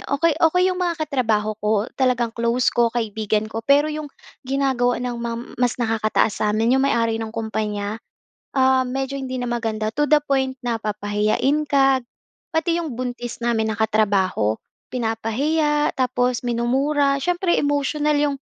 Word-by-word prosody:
Okey 315 +4 +2
okey 345 +3 +4
‘yong 365 - -5
mga 345 -2 0
katrabaho 225 -7 0
ko, 210 +1 +1 0.2
talagang 245 -3 +1
close 235 +2 +1
ko, 235 -1 +3
kaibigan 220 -2 -1
ko. 225 - -3
Pero 285 +5 +3
‘yong 300 -1 -5 0.4
ginagawa 265 -3 +1
ng 245 0 -3
mam 235 0 -3 0.2
mas 245 -1 +2
nakakataas 220 -2 0
sa'min, 215 +3 +2
‘yong 265 +1 +3
may-ari 230 -3 +1
ng 220 -1 -5
kumpanya, 215 -1 -3 0.5
ah, 260 -1 +3
medyo 265 +2 -3
hindi 260 -2 -4
na 245 - -3
maganda, 225 -2 -2
to 295 0 0
the 300 - +7
point 265 -1 0
na 235 - +1
papahiyain 210 +7 0
ka. 270 -2 +4 0.5
Pati 330 +1 0
‘yong 270 -7 -6
buntis 245 -1 -4
namin 230 -2 0
na - - -9
katrabaho, 200 - +1 0.3
pinapahiya, 275 +7 0
tapos 250 -1 +1
minumura. 275 +4 +1
Siyempre 350 +3 +1
emosyonal 290 +1 +1
‘yong 290 -1 +1
245 Hz, 150 wpm, -22 LUFS, 225-280 Hz, 0.5 s, the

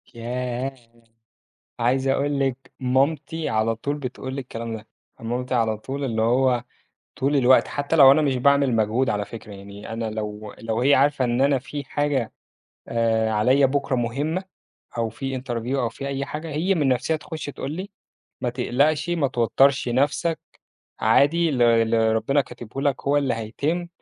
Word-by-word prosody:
ياه! 125 +2 -3 1.1
عايز 130 +3 +1
أقول 140 +1 +1
لِك 135 -1 -2
مامتي 140 +5 0
على 110 +1 +1
طول 140 +6 -3
بتقول 130 -1 -6
لي 140 - -3
الكلام 115 -3 -6
ده. 110 0 -13 0.3
مامتي 125 +3 -3
على 110 -3 +1
طول 135 +5 -5
اللي 115 -4 -1
هو 125 +1 +2 0.5
طول 140 +2 0
الوقت، 130 -1 +5
حتى 145 +3 -2
لو 135 -4 +9
أنا 150 +3 +4
مش 140 -3 +1
باعمل 140 0 +3
مجهود 110 +4 +1
على 105 0 -1
فكرة، 110 -1 -10
يعني 100 +2 -9
أنا 115 0 -3
لو 105 -1 -6
لو 115 +1 -2
هي 140 +3 +5
عارفة 140 -1 +3
إن 120 +1 0
أنا 140 -1 +3
في 145 +2 -6
حاجة 140 -4 -1 0.6
آآ 115 -1 +1
عليّا 130 +6 +4
بكرة 140 0 -1
مهمة، 145 +10 -2 0.5
أو 115 -1 +1
في 135 +3 -4
interview 120 +1 -3
أو 120 - +1
في 135 +5 -8
أي 140 0 -2
حاجة، 150 +3 -6
هي 165 +6 +1
من 150 -6 +1
نَفسها 130 +5 +1
تخُش 155 0 -7
تقول 145 0 -5
لي: 185 +5 -6 0.5
"ما 125 - -1
تقلقش، 140 +6 +1
ما 165 -5 +1
توتّرش 130 +3 +2
نَفسك، 140 +6 +1 0.6
عادي، 165 +4 +4
اللي 120 -5 +4
اللي 115 0 +2
ربنا 135 +6 +2
كاتبه 125 0 -7
لك 140 -2 0
هو 145 - +3
اللي 140 -4 +1
هيتم." 145 +10 -3
130 Hz, 165 wpm, -23 LUFS, 115-140 Hz, 1.1 s, لو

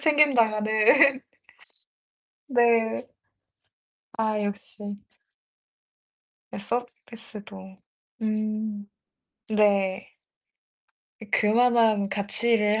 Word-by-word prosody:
챙김 300 -2 +3
당하는. 220 -3 +2 0.2
네. 275 +1 +5 1.3
네. 235 -4 +1 1.1
아 215 -1 0
역시. 205 0 -6 1.6
서비스도 210 -3 -7 0.5
음. 215 -1 -3 0.6
네. 200 -3 +1 1.1
이 220 - -10
그만한 225 -2 +3
가치를 210 +2 0
215 Hz, 110 characters per minute, -25 LUFS, 205-235 Hz, 1.6 s, 네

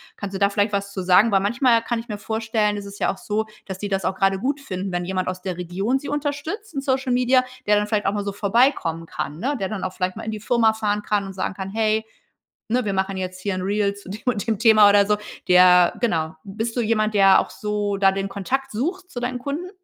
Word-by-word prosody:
kannst 200 -1 -6
du - - -3
da 200 0 +4
vielleicht 205 +1 0
was 200 0 -2
zu 190 - -3
sagen? 190 +5 +5
Weil 195 - +4
manchmal 235 +3 +3
kann 235 0 -2
ich 235 - -9
mir 210 -2 -5
vorstellen, 220 -1 -1
ist 205 - -6
es 200 0 -10
ja - - +1
auch 195 - -9
so, 215 +1 -2 0.2
dass 190 -1 -7
die 205 - -4
das 195 -1 -1
auch 190 - 0
grade 195 0 +2
gut 280 +5 -2
finden, 190 -6 -5
wenn 175 0 -2
jemand 185 0 -2
aus 185 0 -5
der 180 -2 -4
Region 190 +9 -1
sie 285 - -7
unterstützt 295 +7 -4
in 275 - -1
Social 265 -1 0
Media, 255 +1 +3 0.2
der 210 0 +4
dann 210 0 0
vielleicht 210 -1 0
auch 195 - +1
mal 205 -1 -2
so 200 - -3
vorbeikommen 200 - +1
kann, 150 - -5
ne, 275 +6 -1
der 190 - -2
dann 210 -4 -4
auch 185 - -3
vielleicht 185 0 -2
mal 225 - -6
in 220 - -3
die 215 - -5
Firma 225 0 +2
fahren 210 -1 -1
kann 205 -1 -1
und 195 - -7
sagen 190 +1 -3
kann: 190 0 -6
„Hey, 220 0 +1 0.6
ne, 245 +1 +1
wir 195 - -1
machen 190 0 -1
jetzt 185 0 -5
hier 200 - -1
'n 185 - -3
Reel 200 +1 0
zu 200 -2 -13
dem 205 +2 -7
und 235 -3 -1
dem 220 -3 0
Thema.“ 215 -2 +7
Oder 200 0 +5
so. 210 0 +1 0.3
Der 180 -1 +6
genau 160 -9 0
bist 220 +4 -4
du - - +2
jemand, 215 -1 +1
der 195 -1 +6
auch - - -5
so 205 -1 -2
da 195 -1 +5
den 195 0 -3
Kontakt 265 +8 -3
sucht 360 - -3
zu 245 - -6
deinen 250 +1 -2
Kunden? 290 +8 -4
205 Hz, 265 wpm, -22 LUFS, 195-235 Hz, 0.6 s, Thema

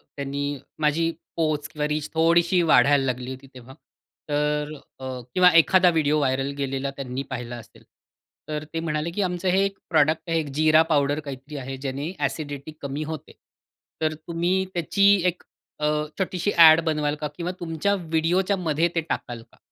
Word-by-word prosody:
त्यांनी 140 0 -3 0.2
माझी 155 +2 +1 0.3
पोच 155 -2 0
किंवा 150 -1 -2
रीच 150 0 -2
थोडीशी 170 +2 +3
वाढायला 140 -3 +4
लागली 125 0 -3
होती 130 +1 -10
तेव्हा 130 +1 -12 0.6
तर 150 +1 0 0.3
अ, 130 - -7 0.3
किंवा 180 -1 +6
एखादा 185 +2 +6
व्हिडिओ 155 -2 +2
व्हायरल 135 0 0
गेलेला 135 0 -2
त्यांनी 135 0 -4
पाहिला 120 -1 -5
असेल 115 - -15 0.7
तर 150 0 -3
ते 165 - -1
म्हणाले, 160 0 -2
की 205 - -2
आमचं 180 0 -2
हे 190 +2 +3
1 195 0 -4
प्रॉडक्ट 155 -1 +3
आहे. 165 0 +2
1 155 - -3
जिरा 155 +2 +5
पावडर 145 -1 +2
काहीतरी 140 +1 -8
आहे, 135 0 -5
ज्याने 135 +2 -4 0.2
एसिडिटी 145 -1 -5
कमी 140 +2 -4
होते, 155 -1 -7 0.7
तर 155 0 +1
तुम्ही 175 +3 0
त्याची 175 +3 0 0.2
1 180 0 -2 0.4
अ, 150 - -1 0.3
छोटीशी 190 +1 -1
ॲड 160 -1 +9
बनवाल 150 -2 0
का? 150 - -1
किंवा 175 +1 -3
तुमच्या 170 +3 -1
व्हिडिओच्यामध्ये 170 0 0
ते 165 - +2
टाकाल 120 -2 -4
का? - - -24
155 Hz, 160 wpm, -24 LUFS, 140-165 Hz, 0.7 s, ॲड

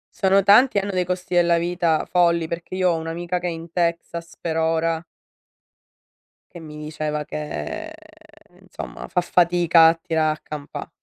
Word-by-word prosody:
Sono 195 -2 +3
tanti 210 +6 +5
e - - +3
hanno 200 +1 -4
dei 185 -2 0
costi 180 0 -4
della 170 -1 +4
vita 170 -2 0
folli, 170 -2 +2
perché 170 +2 -6
io 185 -1 +2
ho 170 - +1
un'amica 170 +2 -3
che 180 - -5
è - - 0
in 165 0 -8
Texas, 170 0 -2
per 165 -2 -3
ora 165 0 +1 1.5
che - - -8
mi 155 -2 -10
diceva 150 0 -4
che 150 - -5 0.7
insomma, - - -9
fa 180 - +1
fatica 175 -1 +4
a 165 - +4
tirà 160 -2 0
a 155 - -8
campà. 150 -1 -7
170 Hz, 165 wpm, -22 LUFS, 160-180 Hz, 1.5 s, tanti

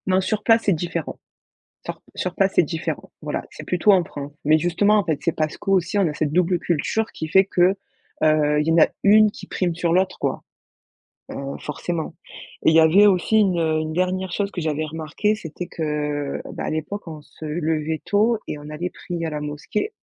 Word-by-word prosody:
Non, 185 0 +3
sur 210 +2 -2
place, 225 0 +4
c'est 200 - +4
différent. 170 -1 -4 0.7
Sur - - -6
sur 180 -1 -3
place, 195 0 +2
c'est - - +6
différent. 165 +1 -4
Voilà, - - -3
c'est - - -10
plutôt 180 +3 +3
en 185 -2 +4
France, 145 -2 -8
mais 155 +2 +5
justement, 175 +6 +2
en 205 - +1
fait, 160 -4 -1
c'est 165 - +2
parce 155 -1 -2
qu'aussi, 195 -1 0
on 195 -3 +3
a 150 - -2
cette 150 -1 -1
double 180 0 +2
culture 175 +8 0
qui 160 - -5
fait 190 +5 +5
que, 185 0 +3 0.5
heu, 150 -1 +3
il 150 - -3
y - - +3
en 165 - +3
a - - +7 0.2
une 210 +1 +6
qui - - -11
prime 180 -2 -1
sur 170 0 0
l'autre 185 +1 +1
quoi, - - -2 0.9
heu, - - -7 0.2
forcément 160 +2 -4 0.5
et - - +6
il - - +2
y - - +8
avait 170 +6 +6
aussi 195 +3 +3
une, 190 -4 +3
heu, 160 -1 +1
une 155 0 -3
dernière 185 +1 -1
chose 200 +2 -1
que 180 - -4
j'avais 155 -1 -1
remarquée, 160 +7 -1
c'était 175 -3 -7
que, - - -9
heu, 150 -2 -2
bah - - -5
à - - -2
l'époque 170 +6 -4
on 155 -2 -8
se 150 +2 -12
levait 155 0 -1
tôt 220 +3 +2
et - - -4
on 150 0 -10
allait 160 +4 -4
prier 170 -1 -5
à - - -2
la 150 - -3
mosquée. 150 - -3
170 Hz, 220 wpm, -22 LUFS, 155-190 Hz, 0.9 s, y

